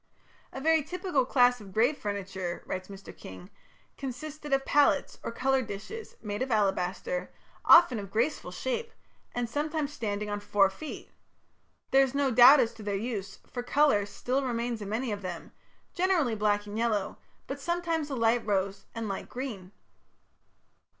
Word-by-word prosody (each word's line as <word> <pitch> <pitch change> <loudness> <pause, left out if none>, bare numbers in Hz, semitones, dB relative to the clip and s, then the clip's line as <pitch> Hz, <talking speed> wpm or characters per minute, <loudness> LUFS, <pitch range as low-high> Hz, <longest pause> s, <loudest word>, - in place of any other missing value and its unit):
"A - - -6
very 320 +3 +3
typical 330 -4 -1
class 245 -3 +4
of 200 -2 -11
grave 235 +9 +3
furniture", 190 -5 -4
writes 185 0 -4
Mr. 195 -1 -11
King, 95 -1 -11 0.5
"consisted 295 +3 -6
of 270 0 +2
palettes, 290 0 +2
or - - -4
colour 265 +2 +1
dishes, 230 - -7
made 205 0 -4
of 260 - -1
alabaster, 205 - 0 0.3
often 330 -9 +7
of 200 -2 -7
graceful 235 +9 -1
shape, 465 -2 -3 0.4
and 245 -1 -1
sometimes 295 +2 -2
standing 210 -5 -3
on 205 0 -3
four 200 -1 +3
feet.... 305 +10 -8 0.8
There 270 - +6
is 270 0 +1
no 280 -2 +2
doubt 250 +5 +9
as 235 -3 +2
to 225 - -12
their 205 -1 -2
use, 200 -3 -4
for 245 - -5
colour 245 -5 +3
still 255 +6 -2
remains 235 -2 -2
in 200 - -5
many 230 +3 -2
of 205 -1 -4
them, 180 -3 -6 0.4
generally 350 -9 +2
black 205 -1 +1
and 205 0 -7
yellow, 215 -4 -1 0.3
but 275 +1 -6
sometimes 335 -2 -1
a 275 - -3
light 230 0 +2
rose 195 -1 -1
and 230 -1 -3
light 195 -1 -5
green." 225 -8 -6
240 Hz, 165 wpm, -29 LUFS, 205-285 Hz, 0.8 s, doubt